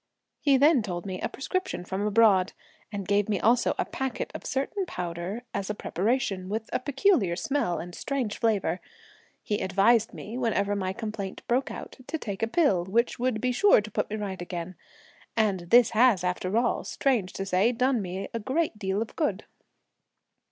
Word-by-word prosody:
He 280 Hz, -3 st, +4 dB
then 285 Hz, -1 st, +5 dB
told 175 Hz, -4 st, -4 dB
me 185 Hz, -2 st, -5 dB
a -, -, -1 dB
prescription 370 Hz, -, -3 dB
from 190 Hz, +2 st, -3 dB
abroad, 205 Hz, -3 st, +4 dB, 0.4 s
and 200 Hz, -3 st, -5 dB
gave 205 Hz, +1 st, +2 dB
me 205 Hz, -3 st, +1 dB
also 240 Hz, +2 st, +3 dB
a -, -, 0 dB
packet 265 Hz, -2 st, -4 dB
of -, -, -7 dB
a -, -, -3 dB
certain 315 Hz, +9 st, -2 dB
powder 180 Hz, -, -4 dB
as 200 Hz, 0 st, -3 dB
a 210 Hz, -, -2 dB
preparative, 200 Hz, -1 st, -1 dB
with 220 Hz, +3 st, -4 dB
a -, -, +2 dB
peculiar 270 Hz, -, +2 dB
smell 275 Hz, -, -1 dB
and 175 Hz, +1 st, -7 dB
strange 255 Hz, -4 st, -3 dB
flavour. 195 Hz, -6 st, +1 dB, 0.6 s
He 210 Hz, -, -1 dB
advised 205 Hz, +4 st, +3 dB
me, 230 Hz, +4 st, -7 dB
whenever 205 Hz, -4 st, +1 dB
my 190 Hz, -2 st, -1 dB
complaint 210 Hz, -2 st, -5 dB
broke 250 Hz, +3 st, +1 dB
out, -, -, -8 dB
to 320 Hz, -, -2 dB
take 200 Hz, -9 st, -5 dB
a 225 Hz, -, +2 dB
pill, 225 Hz, -, +2 dB
which 230 Hz, +7 st, +1 dB
would 245 Hz, -3 st, 0 dB
be 250 Hz, +2 st, 0 dB
sure 395 Hz, -, +5 dB
to 215 Hz, +1 st, -6 dB
put -, -, -1 dB
me 215 Hz, -, -3 dB
right 195 Hz, -4 st, -4 dB
again. 175 Hz, 0 st, -5 dB, 0.6 s
And 195 Hz, -6 st, +1 dB
this 240 Hz, -1 st, +6 dB
has, 225 Hz, -5 st, +4 dB
after 185 Hz, +3 st, -1 dB
all, 240 Hz, 0 st, +1 dB
strange 235 Hz, -10 st, 0 dB
to 195 Hz, -, -4 dB
say, 195 Hz, +5 st, +3 dB
done 250 Hz, 0 st, +1 dB
me 190 Hz, +1 st, -4 dB
a 230 Hz, -, -2 dB
great 265 Hz, +1 st, -1 dB
deal 195 Hz, +1 st, 0 dB
of 230 Hz, -, -14 dB
good." 220 Hz, -, -1 dB
215 Hz, 185 wpm, -27 LUFS, 190-250 Hz, 0.6 s, this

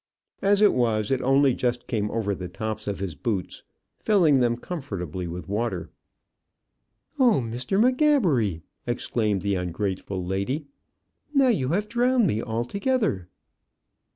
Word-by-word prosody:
As 200 Hz, +1 st, +4 dB
it 210 Hz, -, +6 dB
was, 110 Hz, -3 st, +1 dB
it 130 Hz, -1 st, +1 dB
only 135 Hz, 0 st, +4 dB
just 120 Hz, 0 st, -1 dB
came 105 Hz, -4 st, -1 dB
over 105 Hz, -3 st, -1 dB
the 90 Hz, -2 st, -5 dB
tops 110 Hz, +4 st, -5 dB
of 100 Hz, -2 st, -2 dB
his 95 Hz, -4 st, -3 dB
boots, 95 Hz, +3 st, -3 dB, 0.4 s
filling 170 Hz, -10 st, +4 dB
them 120 Hz, -1 st, +2 dB
comfortably 95 Hz, -, -5 dB
with 90 Hz, +2 st, -6 dB
water. 100 Hz, -3 st, -2 dB, 1.3 s
"Oh, 245 Hz, -, +5 dB
Mr. 125 Hz, -, -2 dB
M'Gabbery!" 215 Hz, -, +3 dB, 0.2 s
exclaimed 110 Hz, -5 st, -1 dB
the 100 Hz, -1 st, 0 dB
ungrateful 95 Hz, +1 st, -3 dB
lady. 100 Hz, -, -2 dB, 0.7 s
"Now 270 Hz, -2 st, +5 dB
you 140 Hz, -, +1 dB
have 200 Hz, +6 st, 0 dB
drowned 245 Hz, +1 st, +2 dB
me 110 Hz, -, 0 dB
altogether." 120 Hz, -, -1 dB
120 Hz, 130 wpm, -25 LUFS, -, 1.3 s, it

